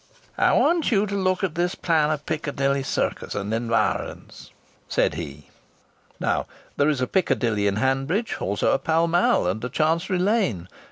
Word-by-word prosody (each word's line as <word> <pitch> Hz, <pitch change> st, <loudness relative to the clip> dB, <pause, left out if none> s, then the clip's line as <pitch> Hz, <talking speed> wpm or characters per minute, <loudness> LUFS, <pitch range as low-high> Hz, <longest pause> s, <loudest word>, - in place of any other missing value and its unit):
"I -, -, +4 dB
want 335 Hz, -5 st, +3 dB
you 205 Hz, -2 st, +3 dB
to 200 Hz, -, -5 dB
look 185 Hz, -1 st, 0 dB
at 185 Hz, -5 st, 0 dB
this 175 Hz, +2 st, -1 dB
plan 160 Hz, -3 st, +1 dB
of 150 Hz, -1 st, -2 dB
Piccadilly 140 Hz, -3 st, -1 dB
Circus 135 Hz, -, -2 dB
and 105 Hz, +1 st, -3 dB
environs," 115 Hz, -1 st, -2 dB, 0.4 s
said -, -, +1 dB
he. 70 Hz, +1 st, -8 dB, 0.7 s
Now -, -, 0 dB, 0.3 s
there 145 Hz, +1 st, +2 dB
is 140 Hz, -4 st, 0 dB
a 125 Hz, -, +1 dB
Piccadilly 115 Hz, -, +1 dB
in 100 Hz, -, +1 dB
Hanbridge; 135 Hz, -, 0 dB
also 100 Hz, +1 st, 0 dB
a -, -, +2 dB
Pall 165 Hz, +1 st, +1 dB
Mall 175 Hz, -, +2 dB
and 95 Hz, +6 st, -2 dB
a 125 Hz, -, -2 dB
Chancery 165 Hz, +7 st, 0 dB
Lane. 185 Hz, -, 0 dB
150 Hz, 165 wpm, -24 LUFS, 115-180 Hz, 0.7 s, I